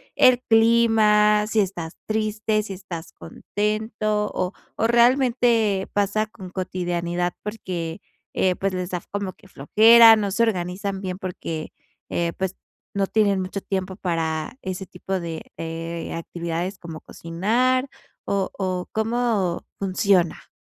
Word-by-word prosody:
¿el 250 -1 +6
clima?, 220 -2 +4
¿si 220 -1 +2
estás 175 -4 -4
triste?, 215 0 0
¿si 200 -2 -6
estás 175 -3 -8
contento? 210 +3 -2
O 185 +1 -1 0.2
o 225 - 0
¿realmente 235 -4 +3
pasa 205 +2 +1
con 190 -4 -11
cotidianidad? 175 -1 -2
Porque, 185 -5 -5 0.3
eh, 185 -1 +2
pues, 195 -1 -1
¿les 180 0 -3
da 180 -1 -2
como 200 -2 -3
que 195 - -20
flojera, 225 +9 +7
no 205 -2 -1
se 230 +4 +1
organizan 190 -1 -2
bien 185 -1 -4
porque, 170 -4 -5 0.4
eh, 170 -1 -1
pues, 190 0 -2 0.4
no 195 -1 0
tienen 200 -3 +2
mucho 185 +1 -4
tiempo 190 -1 -3
para 165 +2 -2
ese 190 0 -4
tipo 185 +1 -4
de, 165 -1 -5
eh, 165 +1 -5
actividades 170 +3 -4
como 165 -2 -8
cocinar?, 240 +10 0 0.4
o 195 -1 -1
o, 185 -2 -2
¿cómo 220 -5 0
funciona? 190 -2 +1
195 Hz, 130 wpm, -23 LUFS, 180-215 Hz, 0.4 s, flojera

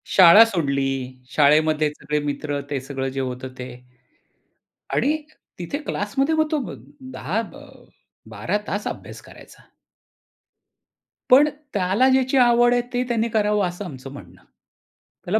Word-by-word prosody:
शाळा 190 +4 +9
सोडली. 140 -10 -1 0.4
शाळेमध्ये 155 +2 +3
सगळे 150 +1 -2
मित्र 145 0 -3
ते 145 -2 -2
सगळं 135 0 -4
जे 135 +1 -5
होतं 130 0 -5
ते. 125 0 -6 1.3
आणि 300 +3 +2 0.4
तिथे 180 +11 -4
क्लासमध्ये 275 +5 -1
मग 315 -1 +1
तो 305 - +1 0.5
10-12 205 - -6
तास 205 +1 -3
अभ्यास - - -8
करायचा. - - -17 1.6
पण 280 +4 +7 0.2
त्याला 195 +6 +2
ज्याची 260 0 +2
आवड 240 -1 +5
आहे 245 - +2
ते 245 0 0
त्यांनी 235 -1 0
करावं 210 -3 +1
असं 180 +3 -7
आमचं 135 -5 -9
म्हणणं. 90 -7 -13 0.8
त्याला 210 +5 +1
185 Hz, 120 wpm, -22 LUFS, 145-240 Hz, 1.6 s, शाळा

